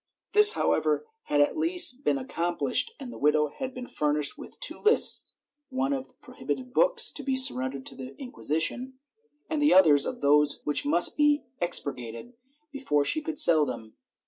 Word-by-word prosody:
This, 420 +1 +8
how - - -1
ever, - - -2 0.2
had 145 -1 0
at 145 - 0
last 330 -5 +3
been - - 0
accomplished, 175 - -2
and 255 -3 -10
the - - -12
widow 150 +1 0
had 265 - -8
been 255 -1 -10
furnished 150 -7 -3
with - - -14
two - - -2
lists 440 +2 +3 0.2
— 295 +1 -58
one 265 +2 -3
of 270 -1 -9
prohibited 255 -1 -8
books - - +2
to - - -9
be 270 -1 -3
surren 130 - +2
dered 135 - -10
to - - -7
the 130 +1 -11
Inquisition, 250 - -4 0.5
and 310 -2 -4
the 295 0 +3
other 180 -5 +5
of 140 -1 -2
those 145 +1 +1
which 150 -1 -2
must 170 +4 +3
be 295 0 +1 0.2
expurgated 140 - -2 0.4
before 210 - -2
she 310 - +2
could 310 0 -7
sell 160 - +6
them. 115 -5 -8
245 Hz, 180 wpm, -25 LUFS, -, 0.5 s, This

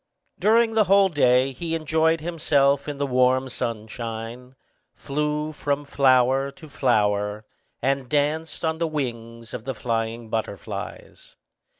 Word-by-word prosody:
During 225 +1 +4
the 220 -1 +4
whole 195 +1 +5
day 130 -4 +3
he 165 +5 -3
enjoyed 160 0 +1
himself 145 -4 +1
in 145 -1 -4
the 140 - 0
warm 130 0 +2
sunshine, 115 +1 -5 0.4
flew 150 +2 -2
from 145 -1 -2
flower 135 -1 +3
to 155 +3 -13
flower, 105 -4 0 0.4
and 135 -1 0
danced 150 +3 0
on 160 0 -1
the 165 - +1
wings 115 -6 -5
of 110 - -5
the 135 -2 -3
flying 115 -1 -3
butterflies. 110 -4 -6
135 Hz, 125 wpm, -24 LUFS, 120-155 Hz, 0.4 s, whole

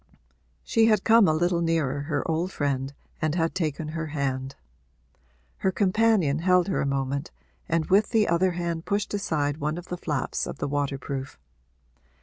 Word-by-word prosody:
She 225 -1 +3
had 215 -1 +3
come 225 -3 +6
a - - +4
little 175 +1 +1
nearer 155 -5 0
her 145 0 -2
old 165 +3 -1
friend 140 -3 -1 0.3
and 155 0 0 0.2
taken 155 -3 -2
her 165 0 -4
hand; 135 -3 -3 1.0
her 190 - +1
companion 195 -6 +2
held 180 +2 +3
her 190 - 0
a - - 0
moment 140 +2 -2 0.4
and 165 -1 +1
with 200 +5 +3
the 220 -3 +3
other 175 +2 +2
hand 170 -1 -3
pushed 200 0 -1
aside 150 -8 -1
one 155 +1 -2
of 175 - -9
the 180 - -3
flaps 150 -7 -2
of - - -6
the - - -2
waterproof. 140 -1 -3
160 Hz, 160 wpm, -26 LUFS, 145-185 Hz, 1.0 s, come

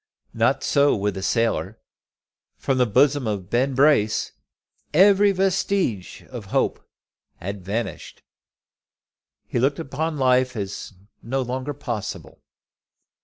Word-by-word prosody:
Not - - +1
so 140 0 +3
with 105 0 -1
the 95 - -6
sailor. 115 +4 0 0.8
From 135 -1 -1
the 125 - +3
bosom 135 +3 +3
of 100 -3 -4
Ben 130 +3 +1
Brace 135 -6 +3 0.6
every 200 +3 +6
vestige 190 - -1
of 120 -5 -7
hope 95 - -1 0.5
had 100 +2 -7
vanished. 110 +5 -5 1.2
He - - -2
looked 140 +3 +1
upon 155 +1 -3
life 130 -1 +2
as 100 0 -5 0.3
no 130 +3 -2
longer 130 +3 -4
possible. 120 -7 -6
130 Hz, 115 wpm, -23 LUFS, 105-145 Hz, 1.2 s, every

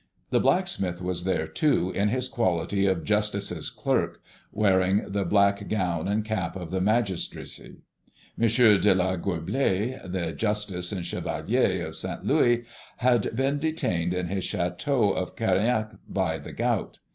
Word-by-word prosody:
The - - +4
blacksmith 90 -2 0
was 90 -1 -3
there 90 -4 0
too 90 - +1
in 100 +1 +1
his 125 +4 0
quality 100 -5 0
of 95 -4 0
justice's 100 -4 -1
clerk, - - -1 0.3
wearing 95 -1 +2
the 100 0 -1
black 100 +2 +2
gown 90 -5 -1
and 105 +2 0
cap 100 -7 -2
of 90 -3 -6
the 95 0 0
magistracy. 105 -2 -2 0.5
M. 115 - +2 0.3
de 100 -2 +4
la 95 0 +1
Goublaye, 100 +7 -1
the 90 -3 -3
justice 105 -4 -2
and 90 -4 -3
chevalier - - 0
of - - -7
Saint - - -4
Louis, 120 0 +3 0.3
had 120 -3 +2
been 135 +3 +1
detained 90 - -1
in 90 0 -1
his 95 0 -2
château 100 +5 0
of 90 - -3
Keriennec 110 +1 +1 0.2
by 90 -5 -1
the - - -9
gout. - - -1
100 Hz, 145 wpm, -26 LUFS, 90-110 Hz, 0.5 s, The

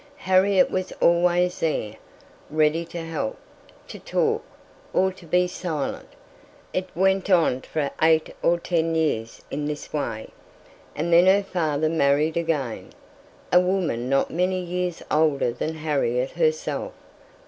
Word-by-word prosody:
Harriet 190 +1 +3
was 185 0 -2
always 175 +1 +2
there, 145 -10 -1 0.6
ready 155 +2 +2
to 170 0 -7
help, 160 -9 -3 0.5
to - - -9
talk, - - 0 0.5
or 190 0 +2
to 180 -2 -15
be 180 +2 +3
silent. 175 -5 -4 0.7
It 185 0 -2
went 190 +2 +2
on 165 -8 +3
for 145 -1 -3
eight 160 0 +3
or 170 - +3
ten 165 -1 0
years 115 -8 -1
in 145 +1 -3
this 150 -1 -5
way; 115 -7 -3 0.7
and 170 +3 -1
then 175 +2 +6
her 200 +2 +5
father 155 -5 -1
married 155 0 +2
again, 155 -8 -2 0.6
a 180 - +8
woman 180 -10 0
not 135 0 +1
many 180 +2 0
years 180 -1 -3
older 150 -5 +2
than 155 +7 -4
Harriet 140 -5 -1
herself. 470 0 -1
165 Hz, 135 wpm, -24 LUFS, 150-180 Hz, 0.7 s, a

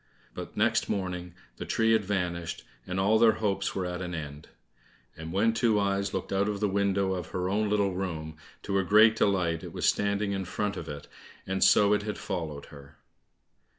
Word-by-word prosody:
But - - -8
next - - +2
morning, 90 -3 -3 0.2
the - - -6
tree 115 0 +2
had 110 -1 +3
vanished, 90 -4 -3 0.2
and 90 +1 -2
all 105 +3 +3
their 115 -1 +6
hopes 100 -2 -1
were 95 - -1
at 90 0 -4
an 90 -1 -4
end. 75 -2 -7 0.7
And 80 +1 -7
when 105 +5 +2
Two 115 -2 +2
eyes 100 0 0
looked 95 0 -4
out 100 +2 +1
of 105 -1 -3
the 105 - +1
window 100 -1 +1
of 90 -3 -4
her 90 0 -3
own 105 +2 0
little 100 -2 +1
room, 80 -4 -4 0.3
to 100 - -4
her 95 - +2
great 110 +4 +6
delight 90 -6 +1
it - - -8
was - - -2
standing 100 0 +1
in 95 -1 -2
front 105 +3 -2
of 80 -3 -7
it, 75 0 -7 0.4
and 95 0 0
so 100 +2 +5
it 105 - +2
had 105 0 -4
followed 80 -7 -5
her. 70 0 -14
95 Hz, 200 wpm, -28 LUFS, 90-105 Hz, 0.7 s, their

